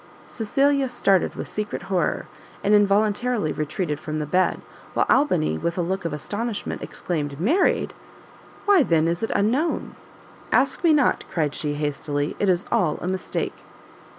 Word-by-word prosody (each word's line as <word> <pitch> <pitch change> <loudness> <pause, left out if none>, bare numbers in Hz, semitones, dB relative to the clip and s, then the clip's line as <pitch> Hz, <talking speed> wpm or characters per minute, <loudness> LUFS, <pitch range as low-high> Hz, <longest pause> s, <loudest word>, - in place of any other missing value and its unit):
Cecilia 275 +4 +1
started 195 -6 +2
with - - -5
secret 210 0 -4
horror, 180 -5 0 0.4
and 205 +1 +3
involuntarily 210 -1 +2
retreated 150 0 -2
from 155 0 -4
the 150 - -2
bed; 180 +4 +1 0.4
while - - +3
Albany 75 +1 +2
with 170 +1 -2
a 175 - +1
look 190 +1 -2
of 165 - -1
astonishment 205 +8 -4
exclaimed, 145 -5 -4
"Married! 290 - +2 0.7
why, 405 -4 +6
then, 165 - +3
is 170 +1 -1
it 225 - -1
unknown?" 255 +11 0 0.6
"Ask - - +2
me 335 - +5
not!" 295 -4 +3
cried 150 -4 -1
she, 150 -1 -2
hastily; 145 0 -2
"it 200 - +2
is 180 0 +2
all 155 -4 +2
a - - -4
mistake." 185 0 -3
185 Hz, 150 wpm, -24 LUFS, 155-220 Hz, 0.7 s, why